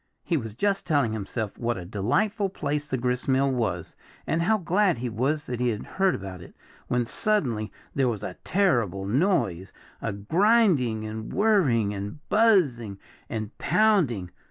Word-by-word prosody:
He 170 - 0
was 115 -8 -3
just 200 - 0
telling 140 -8 +2
himself 110 0 -4
what 120 -1 -1
a 90 - -7
delightful 195 - 0
place 150 -4 -3
the 130 - 0
gristmill 130 +2 +1
was, 105 -9 -2 0.3
and 165 - 0
how 220 +6 +3
glad 185 - +2
he 125 +1 -3
was 135 +7 -1
that 125 -1 -4
he 125 0 +2
had 110 -2 -3
heard 190 -1 +1
about 95 -2 -7
it, 85 - -13 0.3
when 125 -1 +1
suddenly 120 - -1 0.2
there 135 -2 +2
was 110 -4 -4
a - - -4
terrible 120 - +1
noise 100 - +1 0.3
a - - -2
grinding, 145 - +2
and 110 0 -6
whirring, 150 - +2
and 100 +7 -5
buzzing, 150 - +3 0.3
and 110 -1 -4
pounding. 155 - +2
125 Hz, 155 wpm, -26 LUFS, 110-180 Hz, 0.3 s, how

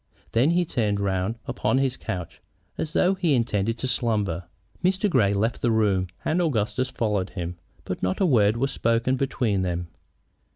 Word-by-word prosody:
Then 120 +6 +3
he 175 +1 +2
turned 105 -8 0
round 95 +2 -1
upon - - 0
his 135 -1 +1
couch, 90 -7 -6 0.3
as 160 +1 -4
though 185 +1 +3
he 175 -6 +2
intended 115 -2 0
to 130 - -3
slumber. 105 -9 0 0.4
Mr. 190 +3 +2
Grey 125 - +3
left 110 +4 0
the 120 - +2
room, 105 -5 +2 0.2
and 175 +3 +2
Augustus 130 -4 0
followed 105 -6 -1
him, 90 -2 -5 0.3
but - - -4
not 95 0 0
a 195 - +3
word 110 - +4
was 135 +3 0
spoken 115 +1 +1
between 125 -7 0
them. 90 -2 -2
115 Hz, 170 wpm, -25 LUFS, 100-135 Hz, 0.4 s, word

